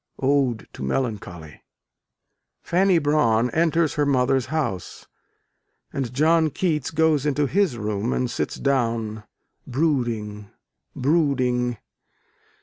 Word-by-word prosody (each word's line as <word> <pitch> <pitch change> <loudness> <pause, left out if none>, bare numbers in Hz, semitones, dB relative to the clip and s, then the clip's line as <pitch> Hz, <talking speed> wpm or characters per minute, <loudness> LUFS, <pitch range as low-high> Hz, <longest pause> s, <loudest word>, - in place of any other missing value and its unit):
Ode 135 -5 +1
to - - -10
Melancholy. 85 - -4 1.0
Fanny 185 +1 +3
Brawne 125 -7 +2
enters 165 0 +2
her 150 - +1
mother's 130 -1 +2
house, 135 - -3 0.9
and 130 -4 -3
John 160 +4 +3
Keats 150 -2 -1
goes 160 -3 +2
into 150 0 +1
his 175 -4 +1
room 105 +1 -2
and 125 - 0
sits 120 - -3
down, 115 -5 -1 0.4
brooding, 120 -8 -1 0.5
brooding. 125 -5 +1
135 Hz, 100 wpm, -23 LUFS, 115-155 Hz, 1.0 s, Fanny